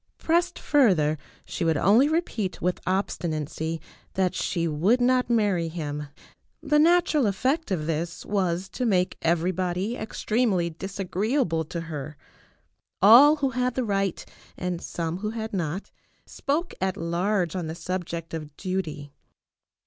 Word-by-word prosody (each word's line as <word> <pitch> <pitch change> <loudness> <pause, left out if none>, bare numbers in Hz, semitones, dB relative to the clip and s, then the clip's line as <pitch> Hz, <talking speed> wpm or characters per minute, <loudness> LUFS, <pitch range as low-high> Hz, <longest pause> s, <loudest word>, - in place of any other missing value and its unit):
Pressed 345 +2 +1
further, 185 - +3 0.3
she - - -4
would 165 -2 +2
only 225 - +5
repeat 275 - -1
with 180 0 -1
obstinacy 165 -4 -2 0.4
that 185 -1 +1
she 170 -2 -1
would 175 +11 +2
not 250 0 +2
marry 205 -7 +2
him. 150 -3 -4 0.5
The 300 0 +2
natural 325 -5 +4
effect 265 - 0
of 170 -6 -1
this 165 +1 -3
was 185 -2 0
to 255 - -3
make 185 -4 +2
everybody 180 +5 0
extremely 215 -5 0
disagreeable 190 - -1
to 170 +2 -5
her. 155 -3 -6 0.8
All 245 - +8
who 275 -3 -1
had 250 0 -1
the 255 - 0
right, 195 -3 -1 0.3
and 180 -1 -3
some 165 0 -3
who 210 +1 -2
had 220 -1 -5
not, 175 0 -3 0.3
spoke 310 +5 -2
at 190 -1 0
large 175 +1 0
on 175 -3 -3
the 160 - -5
subject 170 -2 -4
of 150 -2 -6
duty. 155 -7 -4
185 Hz, 135 wpm, -26 LUFS, 165-230 Hz, 0.8 s, All